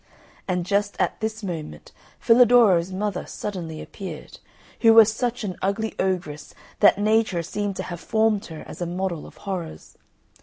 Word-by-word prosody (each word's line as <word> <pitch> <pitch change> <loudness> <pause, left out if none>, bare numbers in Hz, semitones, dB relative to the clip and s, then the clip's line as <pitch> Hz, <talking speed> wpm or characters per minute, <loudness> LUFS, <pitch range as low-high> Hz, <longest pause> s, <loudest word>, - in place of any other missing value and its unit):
And 180 -2 -1
just 205 +2 -1
at - - 0
this 220 0 -3
moment 165 -5 -6 0.3
Filadoro's 230 -7 +5
mother 195 0 -3
suddenly 170 -6 -6
appeared, 195 -2 -9 0.4
who 225 -1 +6
was 220 -1 +7
such 240 0 -2
an 190 -3 -3
ugly 210 +3 -1
ogress 175 -6 -3 0.2
that 205 - +6
Nature 210 -4 +1
seemed 205 +3 -3
to - - -4
have 175 -2 -7
formed 220 +1 +1
her 160 -2 -9
as - - -10
a 175 - -1
model 180 -2 -3
of - - -16
horrors. 175 - -6
195 Hz, 155 wpm, -24 LUFS, 175-220 Hz, 0.4 s, was